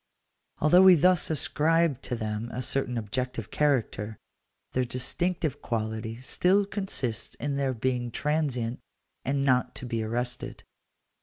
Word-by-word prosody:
Although 165 Hz, +5 st, +5 dB
we 190 Hz, -1 st, +9 dB
thus 180 Hz, +2 st, +3 dB
ascribe 160 Hz, -1 st, +2 dB
to 125 Hz, -, -3 dB
them 110 Hz, 0 st, -3 dB
a 125 Hz, -, -4 dB
certain 125 Hz, -1 st, 0 dB
objective 115 Hz, 0 st, -3 dB
character, 115 Hz, -7 st, 0 dB, 0.6 s
their 130 Hz, -, +2 dB
distinctive 155 Hz, +6 st, -1 dB
quality 110 Hz, 0 st, -3 dB
still 190 Hz, +9 st, +2 dB
consists 135 Hz, -, -2 dB
in 145 Hz, -1 st, -3 dB
their 135 Hz, -2 st, 0 dB
being 120 Hz, +1 st, -1 dB
transient, 130 Hz, -4 st, -1 dB, 0.4 s
and 140 Hz, +1 st, 0 dB
not 125 Hz, -2 st, +2 dB
to -, -, -5 dB
be 115 Hz, -2 st, -2 dB
arrested. 120 Hz, +2 st, -3 dB
130 Hz, 130 wpm, -28 LUFS, 115-150 Hz, 0.6 s, we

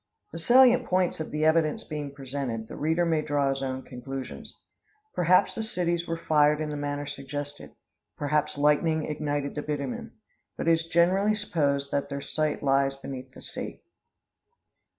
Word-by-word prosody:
The 165 Hz, -, -6 dB
salient 250 Hz, +5 st, +6 dB
points 180 Hz, -2 st, +1 dB
of 155 Hz, -, -4 dB
the 150 Hz, +1 st, 0 dB
evidence 160 Hz, -1 st, +3 dB
being 150 Hz, -2 st, -5 dB
presented, 135 Hz, -5 st, -4 dB
the -, -, -8 dB
reader 160 Hz, +3 st, +1 dB
may 160 Hz, -2 st, +2 dB
draw 145 Hz, -2 st, +1 dB
his 135 Hz, 0 st, -1 dB
own 130 Hz, -1 st, -3 dB
conclusions. 130 Hz, +1 st, -7 dB, 0.5 s
Perhaps 180 Hz, +1 st, +4 dB
the -, -, -3 dB
cities 175 Hz, -5 st, -1 dB
were 165 Hz, -, -2 dB
fired 150 Hz, -2 st, +3 dB
in 155 Hz, -1 st, -2 dB
the -, -, -3 dB
manner 145 Hz, 0 st, -3 dB
suggested 145 Hz, +1 st, -6 dB, 0.4 s
perhaps 150 Hz, 0 st, 0 dB
lightning 150 Hz, +2 st, +3 dB
ignited 145 Hz, -2 st, -2 dB
the 150 Hz, -, -3 dB
bitumen. 145 Hz, -3 st, -4 dB, 0.4 s
But -, -, -3 dB
it -, -, +6 dB
is 165 Hz, 0 st, +2 dB
generally 185 Hz, +5 st, +3 dB
supposed 140 Hz, -9 st, 0 dB
that 140 Hz, 0 st, -1 dB
their 140 Hz, 0 st, -3 dB
site 150 Hz, +1 st, -2 dB
lies 135 Hz, 0 st, +3 dB
beneath 130 Hz, -1 st, -7 dB
the -, -, -10 dB
sea. -, -, -7 dB
150 Hz, 165 wpm, -27 LUFS, 140-165 Hz, 0.5 s, salient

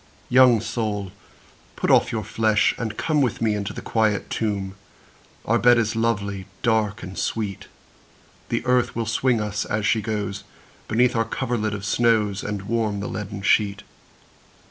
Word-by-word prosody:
II. -, -, -17 dB
Young 125 Hz, -4 st, +7 dB
soul 105 Hz, -4 st, -3 dB, 0.6 s
put -, -, 0 dB
off -, -, +4 dB
your 110 Hz, -3 st, -2 dB
flesh, 110 Hz, +1 st, +2 dB
and 110 Hz, -2 st, -4 dB
come 155 Hz, -2 st, +1 dB
With 130 Hz, -, 0 dB
me 110 Hz, -2 st, +1 dB
into 100 Hz, -1 st, -3 dB
the -, -, -8 dB
quiet 110 Hz, -2 st, 0 dB
tomb, 100 Hz, -3 st, -2 dB, 0.7 s
Our 115 Hz, +2 st, +2 dB
bed 120 Hz, 0 st, +6 dB
is 110 Hz, -1 st, 0 dB
lovely, 100 Hz, -4 st, -1 dB, 0.2 s
dark, 110 Hz, -1 st, +1 dB
and 95 Hz, +1 st, -7 dB
sweet; 105 Hz, -2 st, -3 dB, 0.8 s
The -, -, -1 dB
earth 125 Hz, -1 st, +2 dB
will 115 Hz, 0 st, -1 dB
swing 115 Hz, +2 st, +1 dB
us, 105 Hz, -1 st, -2 dB
as 110 Hz, -1 st, -2 dB
she 110 Hz, 0 st, +2 dB
goes, 105 Hz, -2 st, -3 dB, 0.4 s
Beneath 120 Hz, +3 st, +2 dB
our 115 Hz, -, +3 dB
coverlid 110 Hz, -2 st, -2 dB
of 100 Hz, 0 st, -6 dB
snows, 110 Hz, -4 st, +2 dB
And 105 Hz, -1 st, -3 dB
the -, -, -12 dB
warm 110 Hz, -2 st, -1 dB
leaden 105 Hz, 0 st, -5 dB
sheet. 100 Hz, 0 st, +2 dB
110 Hz, 165 wpm, -23 LUFS, 105-115 Hz, 0.8 s, Young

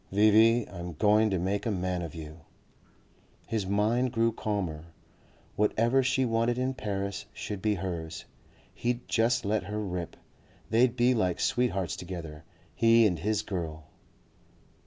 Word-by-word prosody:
"V.V., 110 Hz, +3 st, +5 dB
I'm 90 Hz, -1 st, -6 dB
going 105 Hz, +6 st, +3 dB
to 95 Hz, -, 0 dB
make 95 Hz, +6 st, -1 dB
a -, -, +1 dB
man 90 Hz, -3 st, -1 dB
of 85 Hz, -1 st, -6 dB
you...." 80 Hz, 0 st, -9 dB, 1.1 s
His 110 Hz, -4 st, -2 dB
mind 110 Hz, +5 st, +1 dB
grew 115 Hz, -1 st, +2 dB
calmer. 95 Hz, -8 st, -3 dB, 0.7 s
Whatever 115 Hz, +5 st, +2 dB
she 130 Hz, 0 st, +1 dB
wanted 115 Hz, +1 st, +1 dB
in 130 Hz, +1 st, 0 dB
Paris 100 Hz, -3 st, -4 dB
should 105 Hz, -2 st, -6 dB
be 105 Hz, 0 st, +1 dB
hers. 85 Hz, -3 st, -5 dB, 0.5 s
He'd 120 Hz, 0 st, -2 dB
just 115 Hz, 0 st, +1 dB
let 105 Hz, +1 st, 0 dB
her 105 Hz, +1 st, -4 dB
rip. 90 Hz, -4 st, -4 dB, 0.6 s
They'd 120 Hz, +2 st, +4 dB
be 125 Hz, +1 st, +3 dB
like 95 Hz, -7 st, 0 dB
sweethearts 100 Hz, -8 st, 0 dB
together, 85 Hz, -4 st, -7 dB, 0.3 s
he 115 Hz, 0 st, +5 dB
and 90 Hz, -6 st, +1 dB
his 105 Hz, +4 st, 0 dB
girl. 80 Hz, -7 st, -5 dB
105 Hz, 140 wpm, -29 LUFS, 90-115 Hz, 1.1 s, V.V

